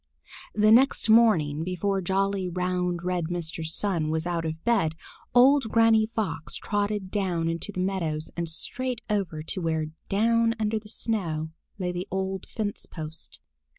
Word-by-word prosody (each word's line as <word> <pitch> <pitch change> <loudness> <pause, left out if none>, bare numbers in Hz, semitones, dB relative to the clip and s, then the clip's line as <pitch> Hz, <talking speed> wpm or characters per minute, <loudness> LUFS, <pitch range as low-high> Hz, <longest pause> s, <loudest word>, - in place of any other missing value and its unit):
The 215 0 +5
next 245 -1 +5
morning, 165 -10 +4
before 190 +2 -1
jolly, 195 0 0
round, 180 -1 -1
red 180 -2 -1
Mr. 165 -1 -4
Sun 165 0 0
was 160 +1 -1
out 170 -2 -1
of 160 0 -4
bed, 200 -10 +2 0.4
old 265 0 +6
Granny 225 -1 +4
Fox 215 -8 -2
trotted 205 -2 -2
down 180 -5 0
on 165 0 -1
to 205 - -2
the 185 - -3
meadows 165 -5 -2
and 170 -1 -2
straight 250 +8 -2
over 175 -7 -1
to 180 - -3
where, 160 -2 0 0.2
down 230 +3 +3
under 215 0 0
the 210 0 -10
snow, 165 -9 -2 0.3
lay 180 -3 -2
the 180 +1 -4
old 190 0 -3
fence 210 -3 -3
post. 160 -1 -7
185 Hz, 155 wpm, -26 LUFS, 165-215 Hz, 0.4 s, old